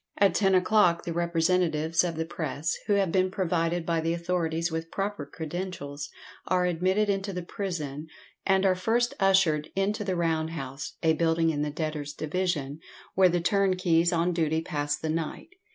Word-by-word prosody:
At 200 -1 +4
ten 195 -2 +3
o'clock 185 -2 +3
the 170 - -3
representatives 165 -1 +1
of 170 -2 -2
the 160 0 -2
press, 160 -1 -3
who 210 - +3
have 195 -4 +2
been 185 +1 +2
provided 175 -3 0
by 165 -1 0
the 165 +1 0
authorities 170 -1 -1
with 160 0 -4
proper 195 -7 -3
credentials, 155 -2 -5 0.4
are 180 -1 +2
admitted 185 +4 +1
into 195 0 -1
the 180 -2 -4
prison, 160 -6 -4 0.4
and 190 0 +3
are 190 - +5
first 230 +6 +1
ushered 185 -6 +3
into 205 +3 0
the 190 -2 -1
round 160 -2 0
house, 135 -3 -6
a 160 -1 +4
building 165 0 +2
in 145 -2 -2
the 150 - 0
debtors' 150 -1 -4
division, 155 -3 -2 0.3
where 185 -1 +5
the 175 0 0
turnkeys 185 -3 +2
on 170 +1 +1
duty 160 -1 0
pass 145 -3 -2
the 160 - -4
night. 165 - -4
170 Hz, 170 wpm, -27 LUFS, 160-185 Hz, 0.4 s, are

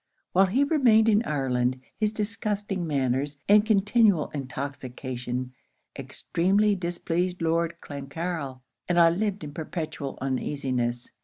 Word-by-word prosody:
While 190 +1 +5
he 250 +9 +2
remained 250 -7 +4
in 210 0 +4
Ireland, 130 -3 0 0.2
his 215 -1 0
disgusting 210 -4 -2
manners, 140 0 0
and 205 +1 +7
continual 210 -5 +3
intoxication, 130 -2 -5 0.4
extremely 200 +5 +1
displeased 175 0 -2
Lord 165 0 +1
Clancarryl; 140 -1 -5 0.3
and 175 0 +3
I 165 -1 +7
lived 200 +1 -1
in 145 -1 -7
perpetual 155 -3 -5
uneasiness. 130 -2 -2
165 Hz, 110 wpm, -26 LUFS, 135-205 Hz, 0.4 s, and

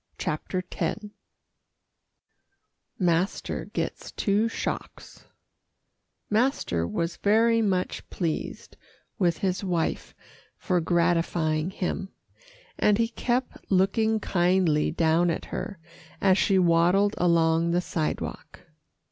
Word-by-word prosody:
CHAPTER 180 +4 -3
X 215 - -2 1.9
MASTER 180 +1 0
GETS - - -4
TWO 205 +2 +1
SHOCKS 225 - -6 1.0
Master 210 - 0
was 170 - -2
very 230 +2 +3
much 185 -4 -1
pleased 165 -4 -4 0.4
with 175 -4 +2
his 190 0 -1
wife 175 -4 -2 0.4
for 180 -2 0
gratifying 165 -1 +1
him, 190 +1 -3 0.7
and 210 -1 +4
he 230 0 +1
kept 245 +2 -2
looking 215 +4 +2
kindly 175 -5 +2
down 165 +1 +2
at 165 - -2
her 200 - -4 0.4
as 190 -2 +4
she 195 0 +2
waddled 180 +3 +3
along 165 -1 +3
the 175 +1 +2
sidewalk. 160 -3 -4
180 Hz, 95 wpm, -26 LUFS, 170-200 Hz, 1.9 s, and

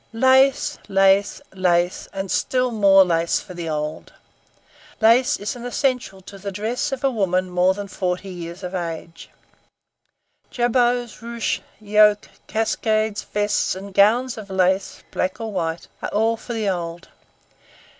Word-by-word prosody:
Lace! 260 +3 +3
Lace! 195 +5 +3
Lace! 180 -1 +1
and 195 -1 -4
still 255 -1 +1
more 195 -3 +6
Lace 165 -1 +1
for 185 - -11
the 170 -2 -5
old. 150 0 -4 0.9
Lace 230 +3 +4
is 205 - -4
an 240 - -9
essential 245 -5 -1
to 195 +1 -12
the 200 +1 -5
dress 220 +8 -2
of 270 -1 -4
a 270 - +3
woman 185 -5 0
more 180 +1 +3
than 205 0 -6
forty 185 0 -3
years 175 0 -8
of 180 +1 -5
age. 165 -2 -6 1.2
Jabots, 245 -1 0
ruches, 235 -1 -2 0.2
yokes, 210 0 +3 0.2
cascades, 220 -1 0
vests, 205 -2 -1
and 195 +1 -9
gowns 230 +5 +3
of 200 -2 -10
lace, 190 0 0
black 185 +3 -2
or 225 -1 -4
white, 165 -3 -3
are - - -3
all 225 +2 +1
for 240 +2 -8
the 220 -2 -2
old. 175 -2 -4
200 Hz, 145 wpm, -22 LUFS, 185-230 Hz, 1.2 s, more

